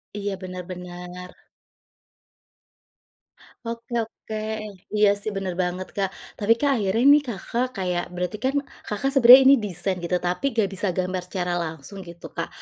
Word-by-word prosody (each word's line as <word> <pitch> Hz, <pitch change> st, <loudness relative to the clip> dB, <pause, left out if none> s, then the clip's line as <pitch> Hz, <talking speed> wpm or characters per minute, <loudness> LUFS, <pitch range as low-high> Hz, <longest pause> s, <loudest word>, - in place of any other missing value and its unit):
Iya, 205 Hz, -1 st, -2 dB
benar 185 Hz, -1 st, -6 dB
benar. 180 Hz, 0 st, -8 dB, 2.4 s
Oke 235 Hz, +1 st, -6 dB
oke. 220 Hz, 0 st, -10 dB, 0.6 s
Iya 210 Hz, -1 st, +5 dB
sih, 215 Hz, -, -3 dB
bener 190 Hz, -2 st, -2 dB
banget, 180 Hz, +1 st, -2 dB
Kak. 195 Hz, -2 st, 0 dB, 0.3 s
Tapi 215 Hz, +2 st, +4 dB
Kak, 285 Hz, -1 st, +3 dB
akhirnya 210 Hz, +3 st, +1 dB
nih, 295 Hz, -, +5 dB
Kakak, 235 Hz, +2 st, -2 dB
kayak, 180 Hz, -2 st, -1 dB
berarti 180 Hz, +4 st, -3 dB
kan, 270 Hz, -, +1 dB, 0.3 s
Kakak, 230 Hz, +6 st, -1 dB
sebenarnya 255 Hz, -1 st, +10 dB
ini 280 Hz, -, +9 dB
desain, 185 Hz, 0 st, -2 dB
gitu. 180 Hz, +1 st, 0 dB
Tapi 180 Hz, +8 st, -2 dB
nggak 220 Hz, -4 st, +1 dB
bisa 200 Hz, +1 st, -2 dB
gambar 185 Hz, 0 st, -1 dB
secara 180 Hz, -1 st, -2 dB
langsung, 160 Hz, +4 st, -8 dB
gitu, 170 Hz, 0 st, -10 dB
Kak. -, -, -1 dB
190 Hz, 145 wpm, -24 LUFS, 180-220 Hz, 2.4 s, sebenarnya